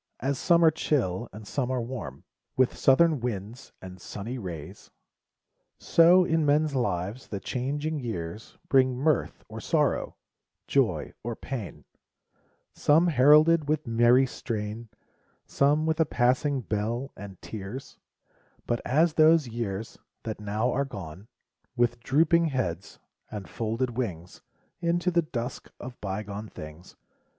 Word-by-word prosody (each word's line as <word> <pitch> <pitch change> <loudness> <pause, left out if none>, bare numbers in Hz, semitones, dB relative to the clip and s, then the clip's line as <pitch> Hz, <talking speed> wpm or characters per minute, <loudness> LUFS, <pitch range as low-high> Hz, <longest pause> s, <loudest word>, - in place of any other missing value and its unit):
As 135 +2 -1
some 170 -1 +4
are 160 - +7
chill, 125 - -1
and 105 +1 -10
some 130 +1 -2
are 130 -1 0
warm 115 - -6 0.3
With 130 -1 +3
southern 155 +2 +4
winds, 115 0 -5
and 90 -1 -10
sunny 115 +8 -6
rays 85 -8 -8 0.5
— - - -52
So, 175 +2 +5
in 160 -1 +1
men's 150 +1 +2
lives, 105 -2 -2
the 100 - -5
changing 145 +8 -3
years 105 -5 -6
Bring 130 -2 +3
mirth 145 +1 0
or - - -8
sorrow, - - 0 0.5
joy - - 0
or 120 0 -3
pain, 120 -7 -7 0.9
Some 165 +4 +3
heralded 150 +2 +5
with 155 -1 0
merry 120 +3 +4
strain, 110 -2 -5 0.6
Some 145 +3 +2
with 160 0 0
a 160 - +4
passing 130 +2 +1
bell, 115 +5 -3
and 95 -2 -10
tears; 110 +5 -8 0.7
But 120 - -1
as 155 +5 +2
those 155 -3 +5
years, 110 -2 -5 0.2
that 110 -2 -5
now 105 +4 -1
are 140 - +1
gone 100 - -9 0.5
With 120 -1 +1
drooping 165 +7 +3
heads, 110 - -3 0.3
and 105 -3 -7
folded 115 +2 -2
wings, 90 -9 -5 0.4
Into 175 +1 +1
the 170 0 +3
dusk 125 -5 -5
of 125 0 -9
bygone 105 +1 -5
things. 75 +3 -11
125 Hz, 135 wpm, -27 LUFS, 105-145 Hz, 0.9 s, are